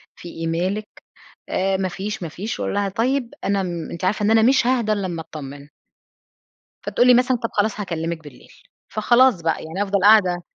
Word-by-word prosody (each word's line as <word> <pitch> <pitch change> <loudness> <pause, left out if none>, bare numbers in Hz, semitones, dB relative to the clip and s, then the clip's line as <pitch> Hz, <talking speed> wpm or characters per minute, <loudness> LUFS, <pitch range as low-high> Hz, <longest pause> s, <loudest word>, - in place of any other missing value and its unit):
في 175 - -10
إيه 165 0 -5
مالِك؟ 185 +6 -2 0.6
آآ، 190 +1 0
ما 190 -1 -1
فيش، 195 +2 -5
ما 165 - -4
فيش، 200 +8 -5
أقول - - -2
لها 200 -1 0
طيب 245 +4 -1
أنا 200 -1 0
م 175 -3 -5
أنتِ 170 - -5
عارفة 205 +2 0
إن 215 - +3
أنا 225 0 +5
مش 255 0 +4
هاهدى 240 -4 +1
إلا 200 -2 -2
اما 170 -2 -4
اتطمن. 145 -2 -10 1.2
فتقول 245 - +2
لي 250 - +8
مثلًا 250 +1 +3
طب 230 -1 -4
خلاص 210 0 0
هاكلمِك 165 -4 -4
بالليل، 145 -4 -15 0.4
فخلاص 240 -1 +4
بقى 165 0 -1
يعني 165 +6 -3
افضل 200 0 0
قاعدة 185 -4 +5
195 Hz, 195 wpm, -21 LUFS, 170-220 Hz, 1.2 s, لي